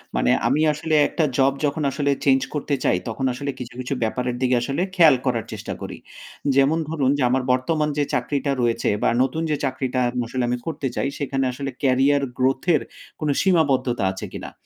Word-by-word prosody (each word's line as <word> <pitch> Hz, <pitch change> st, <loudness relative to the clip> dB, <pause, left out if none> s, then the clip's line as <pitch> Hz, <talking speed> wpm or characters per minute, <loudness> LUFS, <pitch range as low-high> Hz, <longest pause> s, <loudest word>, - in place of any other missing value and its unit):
মানে -, -, +2 dB, 0.2 s
আমি 140 Hz, +6 st, +2 dB
আসলে 155 Hz, +1 st, -1 dB
একটা 160 Hz, -, 0 dB
জব 135 Hz, 0 st, +4 dB
যখন 150 Hz, +2 st, -1 dB
আসলে 140 Hz, +1 st, 0 dB
চেঞ্জ 135 Hz, -1 st, +4 dB
করতে 145 Hz, 0 st, -1 dB
চাই, -, -, +3 dB
তখন 135 Hz, +4 st, -3 dB
আসলে 140 Hz, +3 st, -3 dB
কিছু, 125 Hz, -1 st, -7 dB
কিছু 125 Hz, -, -3 dB
ব্যাপারের 125 Hz, +2 st, -1 dB
দিকে 130 Hz, 0 st, +3 dB
আসলে 140 Hz, +7 st, -2 dB
খেয়াল 160 Hz, -6 st, +7 dB
করার 120 Hz, -4 st, 0 dB
চেষ্টা -, -, -5 dB
করি। -, -, -6 dB, 0.6 s
যেমন 140 Hz, +4 st, +4 dB
ধরুন, 145 Hz, -5 st, +1 dB
যে -, -, +2 dB
আমার 130 Hz, 0 st, +1 dB
বর্তমান 150 Hz, +4 st, 0 dB
যে -, -, +3 dB
চাকরিটা 140 Hz, -1 st, -1 dB
রয়েছে 120 Hz, -1 st, +1 dB
বা -, -, +4 dB
নতুন 145 Hz, +5 st, -2 dB
যে 150 Hz, -, +1 dB
চাকরিটা 130 Hz, -1 st, -1 dB, 0.2 s
আসলে 125 Hz, +2 st, -3 dB
আমি 125 Hz, -, 0 dB
করতে 150 Hz, -4 st, -2 dB
চাই -, -, 0 dB
সেখানে 135 Hz, -2 st, -1 dB
আসলে 135 Hz, +1 st, -4 dB
career 135 Hz, +2 st, +3 dB, 0.2 s
growth 130 Hz, +2 st, +1 dB
এর -, -, +1 dB, 0.4 s
কোনো 150 Hz, -2 st, 0 dB
সীমাবদ্ধতা 140 Hz, -, +2 dB
আছে 95 Hz, -, -6 dB
কিনা। -, -, -7 dB
135 Hz, 190 wpm, -22 LUFS, 130-145 Hz, 0.6 s, খেয়াল